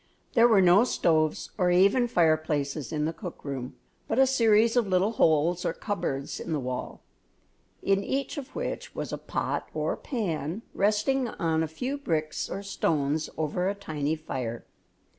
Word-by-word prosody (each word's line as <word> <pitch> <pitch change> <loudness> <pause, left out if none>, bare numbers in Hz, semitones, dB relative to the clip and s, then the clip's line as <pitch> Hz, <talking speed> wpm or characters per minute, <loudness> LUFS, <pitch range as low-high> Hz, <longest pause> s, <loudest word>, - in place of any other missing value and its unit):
There 235 0 +6
were 215 -5 +5
no 180 +5 +6
stoves 160 -9 +1
or 180 -1 +3
even 200 +8 +4
fireplaces 155 - +1
in 150 -1 0
the 160 - -1
cook 180 -4 -9
room, 135 -3 -5 0.3
but 225 - -1
a 265 - +7
series 230 -3 +4
of 240 -4 +3
little 190 +3 +2
holes 165 -2 +2
or - - 0
cupboards 140 -10 -3
in 165 - -4
the 150 - 0
wall, 125 -1 -5 0.8
in 195 0 +2
each 275 +6 -2
of 280 -4 -8
which - - -4
was - - -4
a - - -3
pot - - -3
or - - 0
pan 185 - -3
resting 240 +6 +1
on 160 -7 0
a 160 - 0
few 250 - -4
bricks 155 - -2
or 200 - -5
stones 155 -5 0
over 160 +4 0
a 200 - -2
tiny 155 -6 -2
fire. 125 -7 -5
175 Hz, 165 wpm, -27 LUFS, 155-215 Hz, 0.8 s, a